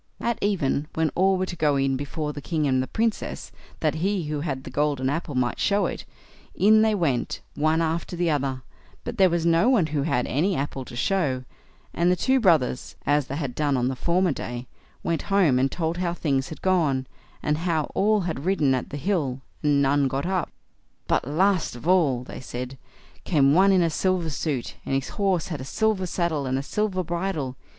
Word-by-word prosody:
At 235 -1 -1
even, 155 -8 0
when 160 -2 +1
all 190 +1 +3
were 185 - 0
to 175 - -6
go 150 -3 +2
in 135 -1 +1
before 150 +2 -4
the 145 - -7
king 155 0 -1
and 130 -2 +2
the 130 - -3
Princess, 225 -1 -2 0.3
that 155 -2 +2
he 195 -1 0
who 150 -1 -3
had 140 -4 -3
the 130 - -8
golden 140 -1 0
apple 150 -2 -3
might 125 -1 0
show 205 0 +2
it, - - -4 0.5
in 215 +2 +5
they 220 -1 +3
went, 145 -10 -1
one 155 +2 +2
after 165 +2 -2
the 170 -1 +1
other, 135 -3 -1 0.4
but 235 -2 -6
there 190 -1 +6
was 170 -1 0
no 170 +8 +4
one 230 -10 +4
who 145 - +1
had 130 -4 0
any 175 +8 +1
apple 135 -2 -3
to 120 - -10
show, 135 -3 0 0.5
and 175 +1 +2
the - - +3
two 260 +8 +2
brothers, 155 - +2
as 145 -1 +2
they 140 - -4
had 140 -5 -3
done 145 0 +1
on 125 0 +1
the 135 - -3
former 175 +5 +1
day, 120 -2 -5 0.4
went 165 -3 0
home 180 -11 +4
and 135 +1 +1
told 165 -1 -2
how 175 -1 -1
things 135 -5 -1
had 160 - -9
gone, 155 -9 +2 0.4
and 150 +1 0
how 165 -3 0
all 210 +1 +3
had 165 -6 -3
ridden 160 -7 +2
at 130 - -2
the 145 - -5
hill, 140 -6 -1 0.2
and 145 -2 +3
none 140 0 +3
got 135 +4 -2
up. 185 -2 -1 0.6
"But, - - +1
last 180 +1 +1
of 120 +7 -8
all", 155 -9 +3
they - - -9
said, 125 +1 -6 0.4
"came 140 -5 +3
one 195 +4 +5
in 185 -2 +4
a 165 - +1
silver 180 -1 0
suit, 140 -3 -3
and 135 - -1
his 135 0 -1
horse 190 -5 0
had 150 -6 -4
a - - -5
silver 205 +5 0
saddle 165 -6 -1
and 130 +1 0
a 135 - -2
silver 195 +2 -1
bridle. 170 -6 -3
155 Hz, 210 wpm, -25 LUFS, 135-185 Hz, 0.6 s, there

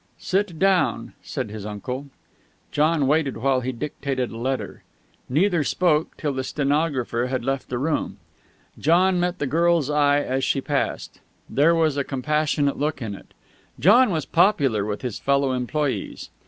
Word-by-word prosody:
"Sit 190 -3 -1
down," 190 +1 +1
said 130 -7 -5
his 105 -2 -7
uncle. 125 +7 -5 0.6
John 150 0 +2
waited 145 -1 +1
while 130 +2 +1
he 130 +1 -2
dictated 135 -1 -3
a 115 - -8
letter. 130 +3 -3 0.5
Neither 170 +4 +2
spoke 160 0 +1
till 145 -2 -2
the 130 0 -2
stenographer 140 -4 0
had 125 -2 -3
left 135 0 -2
the 125 - -2
room. 150 +5 -2 0.6
John 180 +4 +3
met 180 +1 -1
the 145 - -2
girl's 165 0 +2
eye 145 -1 +3
as 130 -1 -2
she 135 - +1
passed. 140 +1 -3 0.3
There 160 +5 +3
was 160 -3 +1
a 140 - +1
compassionate 145 +1 0
look 150 -1 -1
in 110 -5 -4
it. 100 - -12 0.5
John 235 - +6
was 160 -7 -1
popular 145 - +2
with 105 +3 -4
his 125 -4 -4
fellow 140 -1 +1
employes. 130 +3 -3
145 Hz, 155 wpm, -23 LUFS, 130-160 Hz, 0.6 s, John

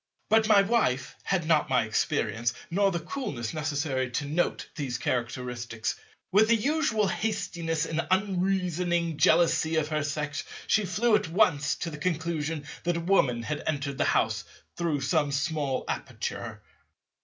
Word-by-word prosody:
But 220 0 +5
my 205 -2 +6
Wife 200 - +1
had 190 -4 0
not 155 -3 +3
my 125 -3 +3
experience, 110 +1 0 0.2
nor 200 +3 +3
the 170 -3 -2
coolness 150 - -4
necessary 145 -4 -1
to 135 +4 -2
note 155 +5 -1
these 130 -5 -3
characteristics. 120 -2 -2 0.4
With 210 +3 +5
the 230 - +5
usual 235 -3 +1
hastiness 175 -7 -1
and 165 0 -2
unreasoning 180 -4 0
jealousy 165 -1 +4
of 155 -1 +1
her 155 -1 0
Sex, 145 -1 -3 0.2
she 215 -2 +2
flew 215 +6 +1
at 210 -6 0
once 165 -6 +3
to 170 - -4
the 150 - -8
conclusion 160 -2 -2 0.2
that 175 0 0
a - - -2
Woman 140 -10 +2
had 150 +4 -3
entered 140 -2 -2
the - - +3
house 110 0 +1 0.3
through 165 -5 -1
some 145 +1 +1
small 145 -2 -1
aperture. - - -5
160 Hz, 150 wpm, -28 LUFS, 140-185 Hz, 0.4 s, my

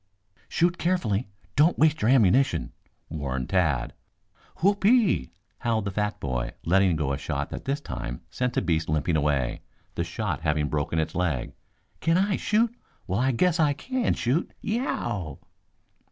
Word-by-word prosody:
"Shoot 175 +1 +1
carefully. 130 - 0 0.3
Don't 155 +4 +4
waste 155 -1 +3
your 110 - +3
ammunition," 130 +1 +3 0.4
warned 70 -5 -3
Tad. 75 -10 +1 0.6
"Whoope 200 +3 +1
e 200 - +6
e 235 -6 +5
e!" 65 - -3 0.3
howled 110 -3 0
the 100 - -2
fat 105 +2 -2
boy, 65 -3 -2
letting 95 0 +4
go 75 -3 -1
a 70 - -3
shot - - -3
that - - -6
this 140 +2 -1
time - - -5
sent 125 -1 -2
a - - +2
beast 85 -3 0
limping 80 +2 +1
away, 70 -5 0 0.3
the - - -1
shot - - -3
having 75 -1 0
broken 75 +2 -1
its 80 - 0
leg. 80 -8 -1 0.5
"Can 165 +1 +2
I 195 +1 +2
shoot? 225 +2 +1 0.3
Well, 95 +3 -1
I 130 +2 +2
guess 170 +7 +2
I 150 -2 +4
can 255 - -1
shoot. 135 +9 0 0.2
Y - - -4
e 230 - +1
o 260 - -2
w!" 95 - -3
105 Hz, 175 wpm, -26 LUFS, -, 0.6 s, e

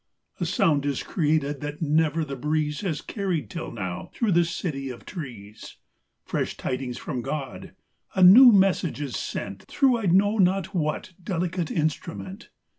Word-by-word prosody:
A 175 - -1
sound 150 -3 +2
is 140 -2 -1
created 150 -4 0
that 150 0 -5
never 160 0 +1
the 140 -2 -5
breeze 150 +3 -1
Has 175 -7 -2
carried 190 -7 -3
till 165 -3 -5
now 95 -6 -5
through 230 -4 +1
the 175 0 +4
city 150 -5 -4
of 125 - -9
trees: 115 - -9 0.5
Fresh - - -2
tidings 130 -1 -3
from 125 - -4
God; 135 +1 -5 0.4
a 190 - +4
new 240 +8 +10
message 190 -6 +2
is 140 -7 -4
sent 100 0 -5
Through 260 -4 +2
I 210 - -2
know 205 +5 +3
not 190 0 +2
what 160 +2 -2
delicate 180 -2 -2
instru 155 +2 -2
ment. 195 +5 -9
160 Hz, 160 wpm, -25 LUFS, 140-185 Hz, 0.5 s, new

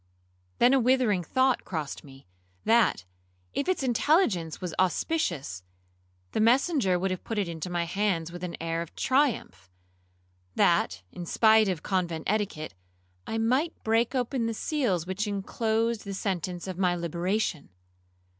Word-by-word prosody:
Then 245 +2 +5
a 270 - +5
withering 245 -6 +3
thought 260 +8 +2
crossed 155 -6 -5
me, 135 -1 -15 0.4
that, 225 - +3 0.5
if 315 - -1
its 370 -7 0
intelligence 235 - +2
was 180 -4 -5
auspicious, 175 - 0 0.7
the - - -1
messenger 240 - +3
would 190 +2 -1
have 185 - -4
put 225 - -4
it 200 -3 0
into 170 +1 -5
my 175 -1 0
hands 170 -2 -1
with 175 0 -8
an 175 -1 -4
air 165 0 -2
of 170 - -8
triumph, 255 - 0 0.9
that, - - +2
in 175 -1 -7
spite 220 +1 +5
of 175 -4 -3
convent 175 -4 -1
etiquette, 200 - -2 0.5
I 225 - -2
might 255 +9 +1
break 225 +3 +1
open 245 -1 0
the 230 - -2
seals 215 - 0
which 190 +4 -2
inclosed 220 +3 -1
the 200 -1 -5
sentence 180 -3 -3
of 185 -1 -5
my 180 -2 +2
liberation. 170 - -2
195 Hz, 145 wpm, -28 LUFS, 170-235 Hz, 0.9 s, Then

